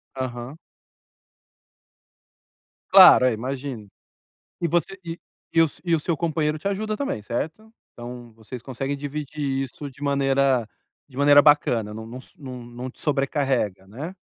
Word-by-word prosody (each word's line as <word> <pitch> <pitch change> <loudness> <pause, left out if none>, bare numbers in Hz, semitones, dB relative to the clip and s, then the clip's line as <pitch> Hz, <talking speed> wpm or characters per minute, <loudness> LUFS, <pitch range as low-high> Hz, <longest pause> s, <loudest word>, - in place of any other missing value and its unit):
Aham. 130 +2 -5 2.3
Claro, 185 -9 +9
é, - - +4
eu - - -1
imagino. 125 -2 -5 0.7
E 170 - +1
você 175 +4 0
e 165 0 -6 0.3
e 165 - +5
o - - +6
s 150 - -9
e 170 -2 +2
o 160 - -1
seu 165 +1 -1
companheiro 155 -1 0
te 175 - -3
ajuda 215 +2 -2
também, 240 - -3
certo? 160 - -5 0.2
Então, 120 -1 -9
vocês 115 +2 -9
conseguem 135 +2 -4
dividir 145 -1 -3
isso 140 +2 -7
de 135 +1 -18
maneira 135 -3 +2 0.4
de 130 -2 -15
maneira 145 0 +7
bacana, 120 -8 +3
não 110 +1 -7
não 120 +3 -8 0.2
não 130 -4 -8
não 125 +2 -7
te - - -20
sobrecarrega, 135 - 0
né? 145 - -7
135 Hz, 150 wpm, -24 LUFS, 120-155 Hz, 2.3 s, Claro